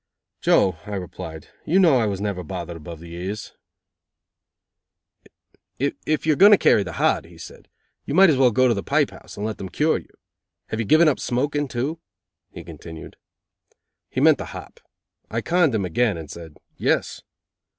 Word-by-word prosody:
"Joe," 95 -4 +3
I 105 - -4
replied, 85 -4 -8
"you 175 - +1
know 165 -9 +5
I 110 - +1
was 100 -2 -3
never 100 -3 -3
bothered 85 0 -6
above 80 0 -9
the 85 0 -11
ears." 95 +5 -6 2.2
"If 145 +3 -2
you 155 - +4
are - - -1
going 200 +6 +7
to 205 - +8
carry 105 - +4
the 90 -4 -5
hod," - - +1
he - - -16
said, - - -12 0.4
"you 140 - -3
might 190 -1 +7
as 140 - +1
well 130 -1 +5
go 130 +3 +3
to 120 - +3
the 100 - -3
pipe - - +1
house, - - -13
and 105 - -3
let 110 -1 -4
them 95 - -6
cure 155 - +1
you. - - -18 0.6
Have 110 - -3
you 115 - -1
given 160 +6 +5
up 150 - +2
smoking, 145 +4 -1
too?" 135 +6 -3 0.5
he - - -9
continued. 80 -2 -10 0.9
He - - -3
meant - - +5
the - - -4
hop. - - -12 0.5
I 115 +1 -2
conned 170 -3 +2
him 100 -3 0
again 105 +3 +1
and 80 -2 -8
said: 80 -3 -11 0.2
"Yes." - - 0
110 Hz, 185 wpm, -23 LUFS, 90-145 Hz, 2.2 s, to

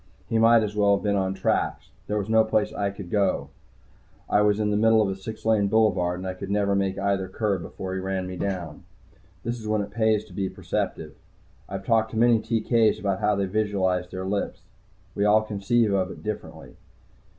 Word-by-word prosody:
He 115 -2 +1
might 115 0 +6
as 105 -1 -4
well 100 -1 +4
have - - -9
been 100 -1 +1
on 95 -1 0
tracks. - - -1 0.2
There 105 - -1
was 100 -1 -2
no 110 0 +4
place 110 -1 0
to 100 0 -3
go 95 +1 0 0.8
I 105 - +3
was 105 0 +3
in 105 -1 +1
the - - +1
middle 110 +1 +4
of 105 -2 +2
a 95 - -2
six 105 +4 -9
lane 110 -3 +3
boulevard, 95 -5 +2
and 95 0 -5
could 100 - -6
never 100 0 +1
make 95 -1 0
either 100 -1 0
curb 100 -2 -1
before 95 +3 -6
he 95 - -2
ran 95 0 -2
me 90 0 -6
down. 90 -5 -4 0.6
This 120 +1 -3
is 110 - -8
when 105 -1 +1
it 100 - -9
pays 110 -1 +1
to - - -16
be 95 -1 -2
a - - -5
perceptive. - - -4 0.6
I've 95 0 -6
talked 110 0 +2
to - - -3
many 115 0 +5
TK's 115 -1 +2
about 100 -2 -1
how 105 -1 +2
they 100 0 0
visualize 95 -3 0
their 95 0 -5
lifts. 100 -2 -2 0.5
We 100 - -1
all 105 +1 +4
conceive 110 +1 +1
of 95 -1 +1
it - - -10
differently. 105 -1 -7
100 Hz, 210 wpm, -25 LUFS, 95-110 Hz, 0.8 s, might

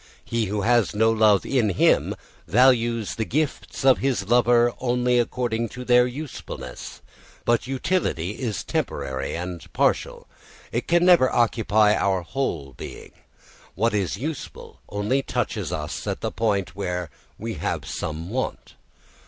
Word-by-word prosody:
He 115 -1 -1
who 105 +1 -2
has 120 -1 +2
no 110 +1 +4
love 110 -3 +4
in 125 -6 +2
him 90 - +3 0.3
values 115 +1 +3
the 110 - -2
gifts 145 +1 -2
of 130 -1 +6
his 130 -8 -1
lover 120 0 +4
only 125 0 +2
according 120 -1 -1
to 125 0 -8
their 125 0 +5
usefulness. 125 - -8 0.4
But 120 +1 +2
utility 130 - -1
is 115 -7 -3
temporary 70 -1 -3
and 90 -1 -6
partial. - - 0 0.5
It 120 - -2
can 175 +1 +3
never 175 -8 +6
occupy 110 -3 +3
our 95 -4 +1
whole 80 - -3
being; - - -9 0.6
what 115 +5 +1
is 100 -4 -1
useful 150 +2 -6
only 105 +7 0
touches - - -2
us - - -4
at - - -3
the - - -2
point 100 -4 -1
where 90 -5 -3 0.3
we - - -4
have - - -2
some 80 +4 -5
want. 130 +2 -3
115 Hz, 140 wpm, -24 LUFS, 100-125 Hz, 0.6 s, of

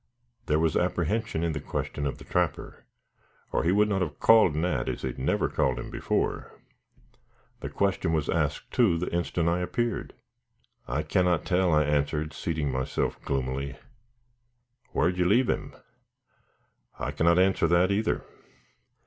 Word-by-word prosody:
There 75 - +2
was 80 0 +1
apprehension 110 -6 0
in 85 - +1
the 75 - -3
question 70 0 -3
of 70 - -4
the - - -12
trapper, 90 -4 -2 0.7
or - - 0
he 85 - +2
would 105 +2 +4
not 100 -2 0
have 85 -4 -3
called 110 -9 +5
Nat, 75 -6 0
as - - -4
he 65 - -1
had 60 - -8
never 65 - +1
called 65 -2 0
him - - -6
before. - - -2 1.0
The - - -5
question 95 -3 0
was 80 -3 0
asked, 75 -3 -1
too, 110 -10 +3
the 85 +1 -3
instant 85 -1 0
I 85 +1 +2
appeared. 120 +5 -2 0.7
"I 75 +4 -1
cannot 90 0 +1
tell," 90 -1 +2
I 75 -1 +4
answered, 75 +1 0
seating 80 -4 -2
myself 65 0 -2
gloomily. 70 +1 -2 1.1
"Whar'd 90 +3 +1
you 90 - +3
leave 115 +7 +3
him?" - - -4 1.2
"I - - -3
cannot 85 +2 +3
answer 95 -2 +3
that 85 +3 +3
either. 105 +2 0
85 Hz, 155 wpm, -27 LUFS, 75-95 Hz, 1.2 s, called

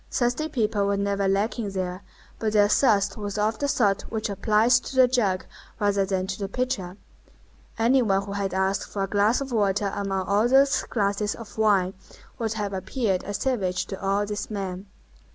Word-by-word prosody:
Thirsty 250 +6 0
people 210 -6 0
were 200 0 +1
never 200 0 0
lacking 205 +3 0
there; 185 -1 -4 0.4
but 215 -1 -1
their 205 -1 +5
thirst 205 -3 +2
was 205 -1 -4
of 215 +1 0
the 285 - 0
sort 200 -7 +2
which 220 -2 -3
applies 215 +4 +3
to 265 - -9
the 260 -1 +6
jug 210 -7 0 0.3
rather 200 -2 +2
than 190 -1 -1
to 190 +1 -5
the 200 - -2
pitcher. 200 -6 -3 0.8
Any 240 +4 +4
one 195 -4 +1
who 200 - -7
had 200 -1 -2
asked 190 +1 0
for 200 - -2
a - - -1
glass 210 +6 +2
of 270 -1 -5
water 205 -2 +1
among 195 -2 -2
all 205 +3 +3
those 270 +2 +4
glasses 205 -1 0
of 215 -3 -11
wine 200 -4 +2 0.5
would 225 -2 -1
have 205 -2 -3
appeared 190 +1 -1
a 205 - -4
savage 200 -7 -1
to 195 - -7
all 200 +1 +1
these 205 0 -4
men. 195 -2 -5
205 Hz, 190 wpm, -25 LUFS, 195-225 Hz, 0.8 s, the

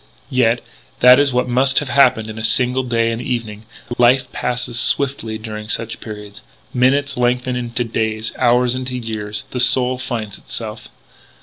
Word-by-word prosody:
Yet, 120 -2 +2 0.4
that 125 +1 +8
is 145 -1 +3
what 125 0 0
must 130 +2 +2
have 145 - +1
happened 125 -4 +3
in 110 0 -7
a - - -5
single 125 +4 +2
day 115 -2 0
and 115 +1 -4
evening. 110 -4 -4 0.3
Life 125 +1 +3
passes 120 -1 -3
swiftly 115 -3 +1
during 110 -1 -8
such 115 0 -2
periods. 105 -2 -9 0.3
Minutes 140 +2 +1
lengthen 125 +1 0
into 120 0 -2
days; 110 -1 -2
hours 125 0 +3
into 130 0 -4
years. 105 -3 -5
The 125 - -3
soul 125 0 +3
finds 110 -6 -5
itself. 110 -1 -7
120 Hz, 160 wpm, -18 LUFS, 110-125 Hz, 0.4 s, that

